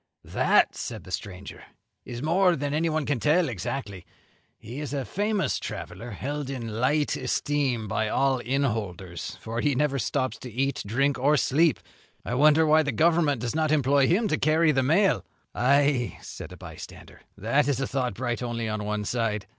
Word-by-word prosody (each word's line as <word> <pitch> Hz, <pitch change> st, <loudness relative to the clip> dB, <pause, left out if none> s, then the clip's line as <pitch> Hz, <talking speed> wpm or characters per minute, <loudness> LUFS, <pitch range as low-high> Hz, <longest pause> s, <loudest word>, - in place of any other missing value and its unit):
"That," -, -, +3 dB
said -, -, -6 dB
the -, -, -12 dB
stranger, 95 Hz, 0 st, -6 dB, 0.4 s
"is 120 Hz, +1 st, -6 dB
more 180 Hz, +3 st, +3 dB
than 145 Hz, -1 st, -3 dB
anyone 155 Hz, -1 st, 0 dB
can 145 Hz, -4 st, 0 dB
tell 160 Hz, +7 st, +3 dB
exactly. 100 Hz, -3 st, -5 dB, 0.5 s
He 120 Hz, +6 st, -8 dB
is 145 Hz, -1 st, -4 dB
a 135 Hz, -2 st, -2 dB
famous 205 Hz, 0 st, -1 dB
traveller, 95 Hz, +7 st, -7 dB
held 140 Hz, +6 st, -4 dB
in 115 Hz, -5 st, -5 dB
light 145 Hz, +3 st, +2 dB
esteem 135 Hz, -7 st, -1 dB
by 110 Hz, +1 st, -1 dB
all 135 Hz, +1 st, +1 dB
inn 135 Hz, +3 st, 0 dB
holders, 95 Hz, -8 st, -4 dB
for 115 Hz, +2 st, -3 dB
he 145 Hz, -2 st, +1 dB
never 140 Hz, 0 st, +1 dB
stops 125 Hz, +1 st, -1 dB
to 125 Hz, -, -8 dB
eat, 135 Hz, +4 st, -1 dB
drink, 135 Hz, +6 st, +1 dB
or 145 Hz, +4 st, +3 dB
sleep. 150 Hz, +2 st, +3 dB, 0.5 s
I -, -, -3 dB
wonder 155 Hz, +4 st, +5 dB
why 155 Hz, +1 st, +5 dB
the 150 Hz, -2 st, -1 dB
Government 155 Hz, 0 st, +2 dB
does 120 Hz, -1 st, -2 dB
not 155 Hz, -1 st, +1 dB
employ 140 Hz, -2 st, +3 dB
him 210 Hz, -, +2 dB
to 155 Hz, -, 0 dB
carry 155 Hz, +1 st, +3 dB
the 135 Hz, -2 st, +2 dB
mail." 170 Hz, +10 st, +3 dB, 0.3 s
"Ay," 140 Hz, -1 st, +2 dB
said -, -, -9 dB
a -, -, -10 dB
bystander, -, -, -11 dB, 0.2 s
"that 125 Hz, +9 st, +1 dB
is 140 Hz, -3 st, 0 dB
a 135 Hz, -, 0 dB
thought 130 Hz, -7 st, -2 dB
bright 120 Hz, +1 st, -2 dB
only 120 Hz, -2 st, -3 dB
on 110 Hz, -1 st, -3 dB
one 105 Hz, 0 st, -2 dB
side. 110 Hz, -3 st, -1 dB
135 Hz, 180 wpm, -26 LUFS, 115-150 Hz, 0.5 s, wonder